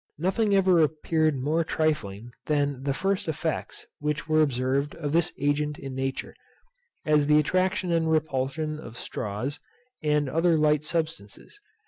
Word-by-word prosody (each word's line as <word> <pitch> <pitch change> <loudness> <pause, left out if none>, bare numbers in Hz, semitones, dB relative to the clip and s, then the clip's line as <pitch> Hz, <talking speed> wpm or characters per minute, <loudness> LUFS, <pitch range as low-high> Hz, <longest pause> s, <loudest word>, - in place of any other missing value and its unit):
Nothing 200 +5 +1
ever 185 -3 +4
appeared 155 0 +1
more 150 +6 +1
trifling 120 -10 -1 0.2
than 145 -3 0
the 140 +1 -1
first 195 +7 -1
effects 160 - -3
which 150 +1 -2
were 155 0 +4
observed 135 0 0
of 150 -4 -3
this 165 +1 +2
agent 145 +1 0
in 135 -1 -7
nature, 135 0 -3 0.7
as 150 -2 +3
the 150 0 +5
attraction 185 +3 +1
and 165 -1 +2
repulsion 155 0 -1
of 120 -6 -10
straws, 105 +9 -4 0.4
and 150 -2 +1
other 165 +4 +2
light 150 -1 +3
substances. 160 - -4
150 Hz, 140 wpm, -26 LUFS, 140-160 Hz, 0.7 s, the